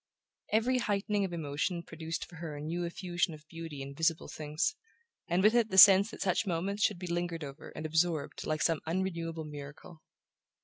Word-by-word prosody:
Every 245 Hz, +4 st, +2 dB
heightening 205 Hz, -2 st, 0 dB
of 185 Hz, -, -5 dB
emotion 165 Hz, +2 st, -2 dB
produced 165 Hz, 0 st, -5 dB
for 175 Hz, -, -14 dB
her 160 Hz, -2 st, -6 dB
a -, -, -6 dB
new 170 Hz, +4 st, -3 dB
effusion 175 Hz, -1 st, -2 dB
of 155 Hz, 0 st, -17 dB
beauty 165 Hz, -4 st, -7 dB
in 140 Hz, 0 st, -8 dB
visible 165 Hz, +2 st, 0 dB
things, 155 Hz, -, -1 dB, 0.5 s
and 175 Hz, +2 st, +1 dB
with 215 Hz, +2 st, +6 dB
it 235 Hz, -2 st, +3 dB
the 190 Hz, -, -2 dB
sense 195 Hz, +2 st, +9 dB
that -, -, -10 dB
such 195 Hz, +2 st, +1 dB
moments 190 Hz, +4 st, -1 dB
should 205 Hz, -2 st, +2 dB
be 180 Hz, -, -7 dB
lingered 175 Hz, -1 st, -2 dB
over 140 Hz, +2 st, -9 dB
and 155 Hz, -, -5 dB
absorbed 160 Hz, -1 st, 0 dB
like 155 Hz, 0 st, 0 dB
some 165 Hz, -3 st, +2 dB
unrenewable 165 Hz, -2 st, -2 dB
miracle. 150 Hz, +2 st, -10 dB
170 Hz, 185 wpm, -31 LUFS, 155-190 Hz, 0.5 s, sense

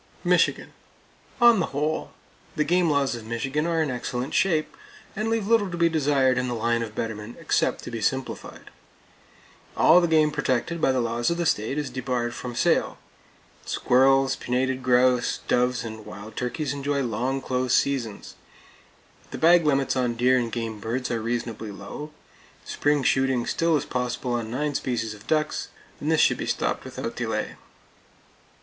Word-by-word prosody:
Michigan: -, -, +2 dB, 0.7 s
On 235 Hz, -3 st, +6 dB
the 165 Hz, -, 0 dB
whole, 150 Hz, +3 st, -2 dB, 0.4 s
the 155 Hz, -, +2 dB
game 175 Hz, +2 st, +2 dB
laws 140 Hz, -3 st, +1 dB
of 120 Hz, -2 st, -6 dB
Michigan 135 Hz, +7 st, -2 dB
are 165 Hz, -1 st, +1 dB
in 145 Hz, -, -2 dB
excellent 125 Hz, +2 st, -4 dB
shape, 160 Hz, -5 st, +1 dB, 0.4 s
and 215 Hz, +2 st, -1 dB
leave 225 Hz, -2 st, 0 dB
little 215 Hz, -2 st, +3 dB
to 175 Hz, -, -5 dB
be 170 Hz, 0 st, +3 dB
desired 140 Hz, -5 st, +2 dB
in 125 Hz, -, -1 dB
the 120 Hz, -, -2 dB
line 115 Hz, +1 st, 0 dB
of 110 Hz, -2 st, -5 dB
betterment 110 Hz, 0 st, -5 dB
except -, -, 0 dB
to -, -, -7 dB
be 115 Hz, -1 st, -4 dB
simplified. 130 Hz, +4 st, -3 dB, 1.1 s
All 175 Hz, +3 st, +6 dB
the 170 Hz, -, +2 dB
game 155 Hz, -2 st, +3 dB
protected 150 Hz, +2 st, -1 dB
by 135 Hz, -, +4 dB
the 130 Hz, -, +1 dB
laws 120 Hz, 0 st, 0 dB
of 170 Hz, -, -1 dB
the 170 Hz, -, -1 dB
state 110 Hz, 0 st, 0 dB
is 150 Hz, -2 st, -3 dB
debarred 125 Hz, -2 st, -2 dB
from 120 Hz, 0 st, -6 dB
sale; -, -, +1 dB, 0.7 s
squirrels, 135 Hz, +1 st, +3 dB
pinnated 130 Hz, +1 st, -1 dB
grouse, 125 Hz, 0 st, +2 dB
doves 125 Hz, 0 st, +1 dB
and 110 Hz, -1 st, -7 dB
wild 100 Hz, +3 st, -10 dB
turkeys 130 Hz, +3 st, -2 dB
enjoy 140 Hz, 0 st, -1 dB
long 125 Hz, +3 st, -1 dB
close 130 Hz, -1 st, 0 dB
seasons; 120 Hz, -7 st, -1 dB, 1.0 s
the -, -, -6 dB
bag 170 Hz, 0 st, +5 dB
limits 135 Hz, -2 st, +2 dB
on 125 Hz, -2 st, 0 dB
deer 125 Hz, +2 st, +3 dB
and 120 Hz, -2 st, -3 dB
game 115 Hz, -2 st, -4 dB
birds 120 Hz, +4 st, -3 dB
are 115 Hz, -1 st, -1 dB
reasonably 115 Hz, -1 st, -3 dB
low; 150 Hz, +8 st, -8 dB, 0.6 s
spring 145 Hz, -1 st, +1 dB
shooting 130 Hz, -2 st, +2 dB
still 165 Hz, -1 st, +1 dB
is -, -, -4 dB
possible 125 Hz, 0 st, -2 dB
on 115 Hz, -2 st, -2 dB
nine 145 Hz, +5 st, -2 dB
species 115 Hz, -5 st, -2 dB
of 105 Hz, -1 st, -15 dB
ducks; 155 Hz, -1 st, 0 dB, 0.3 s
and 150 Hz, -, -1 dB
this 160 Hz, -, +3 dB
should -, -, +4 dB
be -, -, -4 dB
stopped -, -, -1 dB
without -, -, -5 dB
delay. -, -, -2 dB
130 Hz, 170 wpm, -25 LUFS, 120-150 Hz, 1.1 s, On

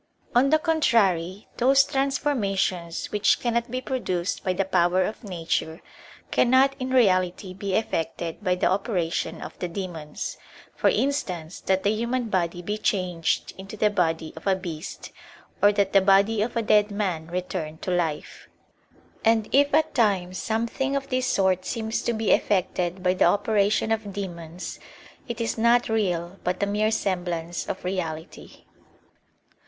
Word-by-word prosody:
On 255 Hz, +3 st, +4 dB
the 310 Hz, -, +5 dB
contrary, 210 Hz, -, +1 dB
those 270 Hz, +3 st, +5 dB
transformations 230 Hz, -, -1 dB
which 210 Hz, -1 st, +3 dB
cannot 235 Hz, 0 st, -1 dB
be 255 Hz, +2 st, -3 dB
produced 185 Hz, -9 st, -2 dB
by 185 Hz, -, +1 dB
the 190 Hz, +1 st, 0 dB
power 185 Hz, 0 st, +2 dB
of 215 Hz, +6 st, -5 dB
nature, 165 Hz, -3 st, -2 dB, 0.5 s
cannot 260 Hz, +2 st, +4 dB
in 255 Hz, 0 st, -3 dB
reality 185 Hz, -6 st, +2 dB
be 195 Hz, 0 st, -3 dB
effected 165 Hz, -3 st, -2 dB
by 180 Hz, -2 st, +2 dB
the 180 Hz, -, -1 dB
operation 185 Hz, -4 st, -1 dB
of -, -, -10 dB
the 180 Hz, -, -2 dB
demons; 170 Hz, -4 st, -5 dB, 0.4 s
for -, -, +3 dB
instance, 185 Hz, -, -1 dB
that 190 Hz, 0 st, 0 dB
the 205 Hz, -, +3 dB
human 235 Hz, +2 st, -1 dB
body 175 Hz, -2 st, -1 dB
be 210 Hz, +4 st, -3 dB
changed 180 Hz, -7 st, 0 dB
into 195 Hz, +3 st, -8 dB
the 210 Hz, 0 st, +3 dB
body 165 Hz, -4 st, 0 dB
of 160 Hz, -, -9 dB
a 195 Hz, -, +4 dB
beast, 175 Hz, -3 st, -7 dB, 0.5 s
or 205 Hz, -, +6 dB
that 200 Hz, -1 st, 0 dB
the 195 Hz, -, +6 dB
body 200 Hz, +3 st, +4 dB
of 230 Hz, +3 st, -2 dB
a 230 Hz, -, +1 dB
dead 210 Hz, -1 st, +4 dB
man 190 Hz, -6 st, -2 dB
return 175 Hz, -3 st, -4 dB
to 185 Hz, -, -4 dB
life. 165 Hz, -4 st, -2 dB, 0.7 s
And 225 Hz, -1 st, +3 dB
if 285 Hz, +1 st, +4 dB
at 310 Hz, +1 st, +2 dB
times 190 Hz, -6 st, +1 dB
something 235 Hz, +5 st, -1 dB
of 275 Hz, 0 st, -3 dB
this 255 Hz, 0 st, 0 dB
sort 190 Hz, -2 st, +2 dB
seems 220 Hz, +2 st, -2 dB
to 235 Hz, -, -1 dB
be 220 Hz, -2 st, 0 dB
effected 185 Hz, -2 st, +1 dB
by 180 Hz, 0 st, +3 dB
the 185 Hz, -, +3 dB
operation 210 Hz, +1 st, +2 dB
of 220 Hz, -2 st, -1 dB
demons, 175 Hz, -3 st, -6 dB, 0.5 s
it 235 Hz, -1 st, -5 dB
is 230 Hz, 0 st, -2 dB
not 235 Hz, +1 st, +4 dB
real 185 Hz, -4 st, -1 dB
but 180 Hz, +2 st, -1 dB
a -, -, +4 dB
mere 210 Hz, +2 st, +1 dB
semblance 175 Hz, -5 st, -2 dB
of 190 Hz, -, -4 dB
reality. 165 Hz, -3 st, -5 dB
195 Hz, 155 wpm, -25 LUFS, 180-225 Hz, 0.7 s, or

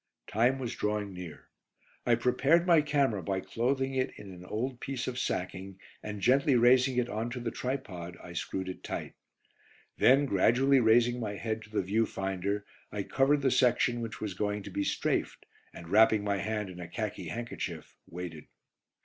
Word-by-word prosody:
Time 120 Hz, +5 st, +2 dB
was 125 Hz, -3 st, -4 dB
drawing 105 Hz, -1 st, -2 dB
near. 90 Hz, -4 st, -9 dB, 0.6 s
I -, -, +5 dB
prepared 140 Hz, +7 st, +3 dB
my 170 Hz, -3 st, +6 dB
camera 140 Hz, -9 st, +1 dB
by 95 Hz, +3 st, -1 dB
clothing 135 Hz, +6 st, -1 dB
it 130 Hz, -1 st, 0 dB
in 100 Hz, -, -10 dB
an 90 Hz, -1 st, -11 dB
old 120 Hz, +7 st, -3 dB
piece 135 Hz, -1 st, -4 dB
of 125 Hz, -1 st, -3 dB
sacking, 95 Hz, -2 st, -3 dB, 0.2 s
and 105 Hz, -1 st, -6 dB
gently 135 Hz, +4 st, +4 dB
raising 125 Hz, +2 st, +5 dB
it 125 Hz, -1 st, +2 dB
on 115 Hz, 0 st, -3 dB
to 125 Hz, +1 st, -5 dB
the 120 Hz, -1 st, -3 dB
tripod 95 Hz, -10 st, -5 dB
I 85 Hz, -, -10 dB
screwed 95 Hz, +2 st, -3 dB
it 95 Hz, -, -7 dB
tight. -, -, -5 dB, 0.9 s
Then 135 Hz, +3 st, +6 dB
gradually 130 Hz, +5 st, +4 dB
raising 120 Hz, +1 st, +4 dB
my 105 Hz, -3 st, -3 dB
head 110 Hz, +1 st, -3 dB
to -, -, -19 dB
the 105 Hz, -2 st, -1 dB
view 110 Hz, +5 st, +1 dB
finder, 95 Hz, +1 st, -2 dB, 0.3 s
I 105 Hz, -1 st, -3 dB
covered 140 Hz, +6 st, +2 dB
the 135 Hz, -, +3 dB
section 120 Hz, -1 st, +3 dB
which 115 Hz, -2 st, -5 dB
was 105 Hz, -3 st, -3 dB
going 105 Hz, +2 st, -2 dB
to 100 Hz, -, -8 dB
be 100 Hz, -, -1 dB
"strafed," -, -, -1 dB, 0.3 s
and 85 Hz, -, -11 dB
wrapping 110 Hz, +2 st, +5 dB
my 100 Hz, -1 st, 0 dB
hand 105 Hz, -1 st, -3 dB
in 90 Hz, -, -10 dB
a 90 Hz, -, -6 dB
khaki 105 Hz, 0 st, -4 dB
handkerchief, 120 Hz, +1 st, -5 dB
waited. 85 Hz, -3 st, -7 dB
110 Hz, 180 wpm, -30 LUFS, 100-125 Hz, 0.9 s, my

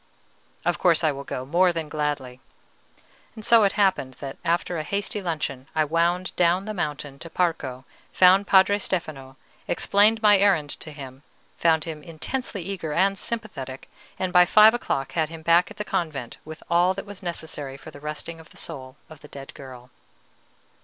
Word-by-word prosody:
"Of -, -, 0 dB
course 170 Hz, -2 st, +3 dB
I 155 Hz, -, +3 dB
will 140 Hz, 0 st, -7 dB
go, 130 Hz, -2 st, -5 dB
more 175 Hz, +6 st, +3 dB
than 165 Hz, -2 st, -4 dB
gladly." 145 Hz, -4 st, -3 dB, 1.0 s
So 220 Hz, 0 st, +5 dB
it 195 Hz, -, +1 dB
happened 190 Hz, -, +1 dB
that 135 Hz, 0 st, -8 dB
after 170 Hz, 0 st, 0 dB
a -, -, -3 dB
hasty 200 Hz, +5 st, -2 dB
luncheon 150 Hz, -7 st, -3 dB
I 155 Hz, -1 st, +3 dB
wound 170 Hz, +4 st, 0 dB
down 180 Hz, +2 st, +2 dB
the 215 Hz, -, -4 dB
mountain 145 Hz, -6 st, -4 dB
to 165 Hz, -, -9 dB
Parco, 150 Hz, -8 st, -1 dB, 0.3 s
found 190 Hz, +2 st, +5 dB
Padre 200 Hz, +1 st, +5 dB
Stefano, 140 Hz, -9 st, -4 dB, 0.3 s
explained 210 Hz, +5 st, +3 dB
my 205 Hz, -2 st, +6 dB
errand 185 Hz, -8 st, +3 dB
to 155 Hz, -, -8 dB
him, 135 Hz, -2 st, -10 dB, 0.4 s
found 160 Hz, -2 st, +3 dB
him 160 Hz, -2 st, -6 dB
intensely 180 Hz, -, -5 dB
eager 170 Hz, -5 st, -4 dB
and 195 Hz, +4 st, +2 dB
sympathetic, 175 Hz, -, -6 dB, 0.3 s
and 185 Hz, -1 st, -2 dB
by 180 Hz, -, +8 dB
five 215 Hz, +4 st, +7 dB
o'clock 135 Hz, -, -2 dB
had 155 Hz, +1 st, 0 dB
him 165 Hz, -1 st, -10 dB
back 170 Hz, +3 st, +4 dB
at 210 Hz, -, -12 dB
the 210 Hz, -, -4 dB
convent 150 Hz, -, -3 dB
with 155 Hz, +1 st, -10 dB
all 175 Hz, +2 st, +3 dB
that 195 Hz, -, -6 dB
was 205 Hz, -1 st, -10 dB
necessary 160 Hz, -6 st, -5 dB
for 155 Hz, -, -12 dB
the 145 Hz, -, -12 dB
resting 150 Hz, +2 st, -6 dB
of 160 Hz, -, -15 dB
the -, -, -17 dB
soul 130 Hz, -5 st, -7 dB
of 155 Hz, -2 st, -13 dB
the 150 Hz, -, -14 dB
dead 140 Hz, -1 st, -10 dB
girl. 130 Hz, -2 st, -12 dB
165 Hz, 180 wpm, -24 LUFS, 145-190 Hz, 1.0 s, by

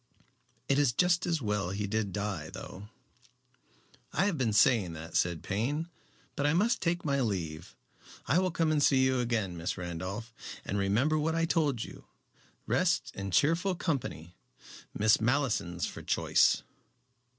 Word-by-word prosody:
"It 140 Hz, +1 st, +3 dB
is 140 Hz, -5 st, +3 dB
just 180 Hz, +5 st, +2 dB
as 165 Hz, -6 st, 0 dB
well 105 Hz, -4 st, -1 dB
he 100 Hz, +2 st, -2 dB
did 105 Hz, -1 st, -1 dB
die, 95 Hz, -6 st, -3 dB
though." 100 Hz, +3 st, -9 dB, 1.2 s
"I 190 Hz, -, +1 dB
have 200 Hz, -4 st, +1 dB
been 125 Hz, -6 st, 0 dB
saying 105 Hz, -4 st, +4 dB
that," 80 Hz, +2 st, -9 dB
said 85 Hz, -2 st, +1 dB
Payne; 140 Hz, -, -2 dB, 0.5 s
"but 145 Hz, -, +1 dB
I 150 Hz, -, +3 dB
must 215 Hz, +7 st, +2 dB
take 175 Hz, 0 st, -1 dB
my 140 Hz, -2 st, +1 dB
leave. 85 Hz, -9 st, -3 dB, 0.5 s
I 150 Hz, +9 st, +3 dB
will 185 Hz, 0 st, +1 dB
come 165 Hz, -2 st, 0 dB
and 150 Hz, -1 st, +2 dB
see 135 Hz, -2 st, +4 dB
you 130 Hz, -1 st, +2 dB
again, 115 Hz, -7 st, -1 dB
Miss 85 Hz, +2 st, -3 dB
Randolph, 95 Hz, +6 st, -5 dB, 0.3 s
and 100 Hz, -, -2 dB
remember 120 Hz, +11 st, +2 dB
what 160 Hz, +2 st, 0 dB
I 165 Hz, 0 st, +2 dB
told 150 Hz, -8 st, +1 dB
you. -, -, -11 dB, 0.6 s
Rest -, -, +1 dB
and 100 Hz, 0 st, -5 dB
cheerful 165 Hz, -, +2 dB
company 125 Hz, -, -3 dB, 0.6 s
Miss 110 Hz, +1 st, +3 dB
Malleson's 115 Hz, -9 st, 0 dB
for -, -, -7 dB
choice." -, -, +2 dB
115 Hz, 155 wpm, -30 LUFS, 100-155 Hz, 1.2 s, saying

